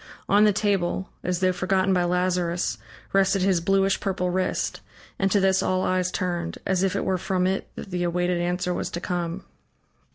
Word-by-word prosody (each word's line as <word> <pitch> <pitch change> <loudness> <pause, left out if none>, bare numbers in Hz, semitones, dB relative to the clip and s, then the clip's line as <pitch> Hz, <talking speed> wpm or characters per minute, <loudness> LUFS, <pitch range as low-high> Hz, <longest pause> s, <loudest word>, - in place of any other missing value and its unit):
On 205 +2 +5
the 210 - +5
table, 195 -2 0
as 180 0 -1
though 185 0 +4
forgotten 190 +1 +1
by 180 -1 +2
Lazarus, 180 -1 0 0.3
rested 195 0 +3
his 185 -3 +2
bluish 195 +2 +2
purple 180 -2 -1
wrist, 185 0 -1 0.4
and 195 - +2
to 200 - +3
this 190 -1 +3
all 185 0 0
eyes 185 0 +1
turned, 175 -3 -2
as 185 -1 +1
if 195 +1 +1
it - - -1
were 185 -1 0
from 185 0 0
it 190 +1 -1
that 195 - -8
the 180 0 -2
awaited 175 0 0
answer 180 +1 -1
was - - -3
to 175 - -4
come. 175 +1 -3
185 Hz, 190 wpm, -25 LUFS, 180-195 Hz, 0.4 s, On